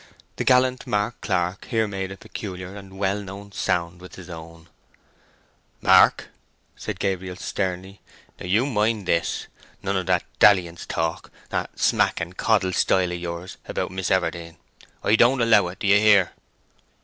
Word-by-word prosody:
The - - -1
gallant 130 0 +3
Mark 105 +3 -1
Clark 90 -1 -1
here 110 -3 0
made 95 -1 -4
a 100 - -8
peculiar 95 -1 -7
and 95 -1 -11
well 100 +1 0
known 100 +1 -9
sound 85 -2 -2
with 90 - -11
his 90 -2 -11
own. 80 0 -11 1.1
"Mark," - - +5 0.5
said - - -6
Gabriel, 95 -2 -2
sternly, 95 +1 -4 0.4
"now - - -7
you 105 +8 +3
mind 110 -5 0
this! 85 - 0 0.4
none 100 +1 -1
of 95 -1 -2
that 90 -1 +2 0.2
dalliance 90 -4 +4
talk—that 80 0 -4
smack - - +2
and 85 +2 -5
coddle 100 -4 +1
style 90 -1 +2
of 90 - -4
yours—about 85 +2 -5
Miss 95 0 -3
Everdene. 85 -3 -1 0.5
I 105 - +4
don't 125 +4 +4
allow 110 -5 +4
it. 90 - -8
Do - - -5
you 100 +1 +6
hear?" 100 -4 +5
95 Hz, 150 wpm, -24 LUFS, 90-105 Hz, 1.1 s, you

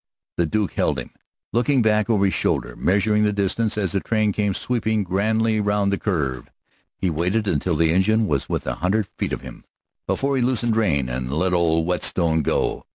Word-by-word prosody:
The 85 - +1
Duke 105 +5 -1
held 75 - 0
him, 65 - -6 0.4
looking 125 +1 +2
back 105 -1 +2
over 105 -3 +3
his 95 - +1
shoulder, - - -1
measuring 105 +3 +2
the 105 -1 +3
distance 105 +2 -1
as 95 -5 0
the 100 - 0
train 110 0 0
came 100 -1 -1
sweeping 110 -3 0
grandly 110 +4 +1
round 105 -1 +1
the 100 - -1
curve. 70 - -2 0.5
He 95 -3 -1
waited 90 +7 0
until 85 +1 0
the 80 +1 +2
engine 110 +5 +2
was 70 -8 -1
within - - -2
a - - -4
hundred 100 +3 0
feet - - -1
of - - -3
him - - -11 0.4
before 140 0 0
he - - +1
loosed 120 -1 0
rein 80 - +1
and 60 +1 -4
let 90 +5 0
old 80 -2 +2
Whetstone 85 -2 +1
go. - - -1
100 Hz, 195 wpm, -22 LUFS, 85-110 Hz, 0.5 s, over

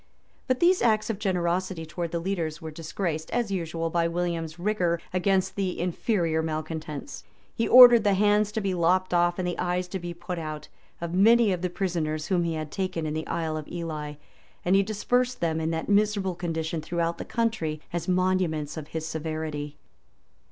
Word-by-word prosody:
But 255 -1 +1
these 360 +2 +4
acts 215 -1 +2
of 205 - -6
generosity 180 -3 -1
towards 170 +1 -4
the 170 - -1
leaders 165 -3 -2
were 160 -1 -7
disgraced, 160 0 -4
as 240 -4 -1
usual, 165 -3 -2
by 170 0 +2
William's 170 -1 -2
rigor 175 -3 0
against 190 +1 +1
the 190 -2 -2
inferior 170 -2 0
malecontents. 155 - -5 0.3
He 230 - 0
ordered 240 -3 +9
ihe 200 - +4
hands 210 +1 +3
to 220 - -1
be 195 -2 -1
lopped 180 +2 +2
off, 175 0 +3
and 185 -1 -1
the 175 - -3
eyes 180 0 -1
to 190 - -4
be 175 -1 -6
put 175 +1 -5
out, 155 -1 -6 0.3
of 170 0 -4
many 220 +3 +5
of 180 -2 -2
the 180 - -1
prisoners 165 -4 -2
whom 175 -3 +2
he 165 -1 -1
had 155 -1 -5
taken 185 -4 -2
in 150 - -2
the 155 0 -4
Isle 160 -2 -2
of 155 - -6
Ely; 155 -4 -5 0.5
and 180 +2 +4
he 195 - +6
dispersed 245 +5 0
them 160 -1 0
in 160 - -1
that 160 0 -2
miserable 205 -2 +2
condition 165 -2 -3
throughout 170 +1 -2
the - - -3
country, 220 -10 -1
as 175 -2 -3
monuments 180 -5 0
of 150 -2 -6
his 160 0 -4
severity. 155 -2 -4
175 Hz, 185 wpm, -26 LUFS, 160-195 Hz, 0.5 s, ordered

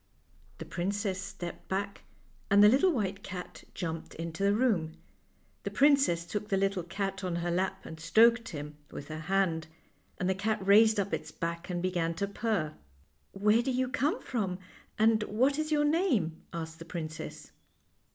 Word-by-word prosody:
The - - -7
princess 195 +1 -2
stepped 195 -3 -7
back, 200 +1 -2 0.5
and 200 +1 +7
the - - +10
little 280 - +4
white 200 - -2
cat 180 -2 -8
jumped 165 -3 -5
into 165 +2 -5
the 200 +1 +3
room. 200 -10 +1 0.6
The - - -3
princess 275 - +4
took 210 +4 -4
the 195 - +2
little 195 -1 +1
cat 195 +2 -4
on 180 -2 -1
her 170 0 -1
lap 185 +2 -1
and 160 - -8
stroked 230 +7 +4
him 150 -1 -7
with 140 - -8
her 155 0 -5
hand, 165 -2 0 0.5
and 180 - -1
the 190 - +3
cat 215 +3 -1
raised 215 +2 +6
up 200 0 -1
its - - -3
back 170 0 -4
and 175 -1 -2
began 170 -3 0
to 200 +4 -1
purr. 200 -7 -1 0.3
" - - -42
Where 210 +3 +3
do 245 - -2
you 255 0 0
come 290 +3 0
from, 195 -7 -2 0.4
and 220 0 +4
what 260 +8 +1
is 310 0 -2
your 295 -1 +3
name? 285 - +1
" - - -36
asked 160 -1 -6
the 165 - -8
princess. 160 -2 -6
195 Hz, 180 wpm, -30 LUFS, 170-220 Hz, 0.6 s, the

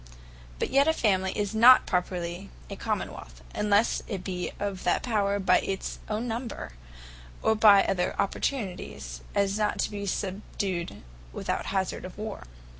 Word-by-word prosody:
But - - -2
yet 280 +2 +4
a 320 - +4
Family 190 -8 +1
is 205 -1 -1
not 240 +4 +8
properly 175 - -2 0.2
a - - -4
Common - - -2
wealth; - - -12
unlesse 210 +2 +2
it 195 -4 -4
be 180 -2 -3
of 200 -2 -3
that - - +1
power 200 -4 +1
by 190 - +4
its 195 -1 -4
own 220 +3 -2
number, 230 - -4 0.7
or 220 - +4
by 210 -2 +7
other 180 -1 0
opportunities, 70 - -3
as 200 +1 +1
not 210 -1 +1
to - - -1
be 200 -1 -4
subdued 190 - -3 0.3
without - - -2
the - - -8
hazard 190 -1 -1
of 185 - -9
war. 215 - -6
200 Hz, 160 wpm, -27 LUFS, 180-215 Hz, 0.7 s, not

